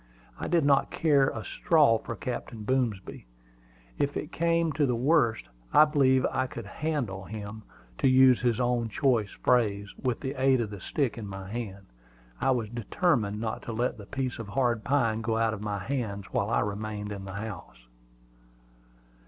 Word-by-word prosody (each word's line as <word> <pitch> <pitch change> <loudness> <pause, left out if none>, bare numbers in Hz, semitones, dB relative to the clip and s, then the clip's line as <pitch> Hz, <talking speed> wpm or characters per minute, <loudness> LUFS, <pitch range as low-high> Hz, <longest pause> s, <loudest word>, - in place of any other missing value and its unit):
I - - -3
did 170 -4 +2
not 140 -1 +3
care 145 -4 +3
a 110 - -5
straw 145 -9 +3
for 115 - -6
Captain 115 -1 -5
Boomsby. 110 - -2 0.7
If 140 0 0
it 150 - -5
came 165 -1 +1
to 150 -1 +1
the 125 - +1
worst, 120 -2 +2 0.3
I 155 - +8
believed 135 -4 +3
I 130 - 0
could 120 -3 -8
"handle" 115 -7 -3
him, 105 +2 -7 0.4
to - - +3
use 130 -1 +6
his 120 -2 +1
own 120 -2 +1
choice 115 -4 +1
phrase, 105 -5 +1
with 125 -2 -1
the 135 -1 -3
aid 135 -1 +4
of 110 -3 -2
the 100 -3 -8
stick 135 - -1
in 105 - -6
my 95 -1 -7
hand. 100 -4 -6 0.5
I - - +1
was 120 -5 +1
determined 120 - 0
not 110 0 -3
to 115 - -6
let 120 +1 -1
the 105 - -10
piece 130 -3 -3
of 115 - -6
hard 120 0 0
pine 115 -6 +1
go 110 0 0
out 115 -1 +2
of 105 - -6
my 105 -1 -2
hands 100 -2 -3
while 100 - 0
I - - +2
remained 105 0 -4
in 100 -1 -6
the 95 - -7
house. 100 - -8
115 Hz, 180 wpm, -28 LUFS, 105-135 Hz, 0.7 s, I